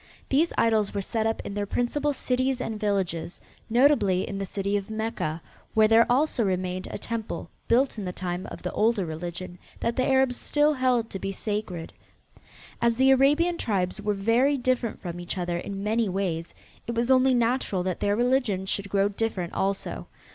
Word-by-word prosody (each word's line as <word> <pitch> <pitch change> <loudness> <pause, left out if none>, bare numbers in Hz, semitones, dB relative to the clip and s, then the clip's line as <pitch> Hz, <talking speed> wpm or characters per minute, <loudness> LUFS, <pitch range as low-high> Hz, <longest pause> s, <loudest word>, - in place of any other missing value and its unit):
These 310 +5 +3
idols 220 -3 +2
were 200 - 0
set 220 +2 0
up 225 - -1
in - - -5
their 205 0 -2
principal 290 +7 0
cities 260 -1 0
and 225 -4 -4
villages, 185 -5 -1 0.3
notably 230 -7 +3
in 195 - -4
the 195 - -3
city 200 +1 -2
of 200 0 -2
Mecca, 220 -8 -3 0.3
where 220 0 +6
there 225 +2 +5
also 260 -2 +2
remained 185 -1 -2
a - - -5
temple, 225 +1 -5 0.2
built 245 0 +2
in 200 - -4
the 180 - -2
time 180 0 -4
of - - -9
the - - -2
older 215 -3 +2
religion, 175 +2 -6 0.2
that 235 - -1
the 255 - +1
Arabs 265 -2 +3
still 295 +1 +2
held 250 -4 +1
to 195 - -4
be 195 - -3
sacred. 195 -4 -4 0.9
As 235 -1 +3
the 265 +2 +5
Arabian 295 +6 +3
tribes 190 -2 -1
were 210 0 0
very 235 +8 +2
different 250 -3 -1
from 175 -2 -6
each 175 +2 -5
other 175 -1 -1
in 195 +2 -5
many 220 0 +1
ways, 180 -3 -2 0.3
it 235 - -3
was 235 +2 +1
only 260 0 +5
natural 235 -6 +1
that 185 -1 -2
their 205 0 +1
religion 240 -5 +1
should 200 +1 -2
grow 195 0 +2
different 200 -4 -3
also. 195 0 -2
215 Hz, 185 wpm, -26 LUFS, 190-250 Hz, 0.9 s, where